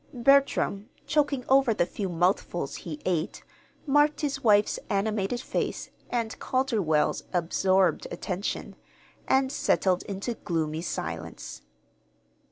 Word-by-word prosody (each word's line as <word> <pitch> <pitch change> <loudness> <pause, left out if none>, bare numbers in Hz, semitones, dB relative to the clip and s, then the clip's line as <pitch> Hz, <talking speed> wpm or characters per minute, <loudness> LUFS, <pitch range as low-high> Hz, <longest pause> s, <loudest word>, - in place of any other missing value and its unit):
Bertram, 245 -5 +3 0.2
choking 290 -4 +1
over 265 -4 +4
the 175 - +2
few 195 +2 -4
mouthfuls 175 -3 0
he 155 -3 -7
ate, 175 0 -1 0.4
marked 295 +1 +3
his 290 -2 -2
wife's 210 -2 +4
animated 205 +2 0
face - - -3 0.2
and 230 -2 -2
Calderwell's 210 - +1
absorbed 185 +2 +2
attention, 180 +3 -4 0.5
and 265 0 +3
settled 185 -7 +1
into 200 +4 -3
gloomy 160 -6 -2
silence. 65 - -5
200 Hz, 105 wpm, -27 LUFS, 175-255 Hz, 0.5 s, over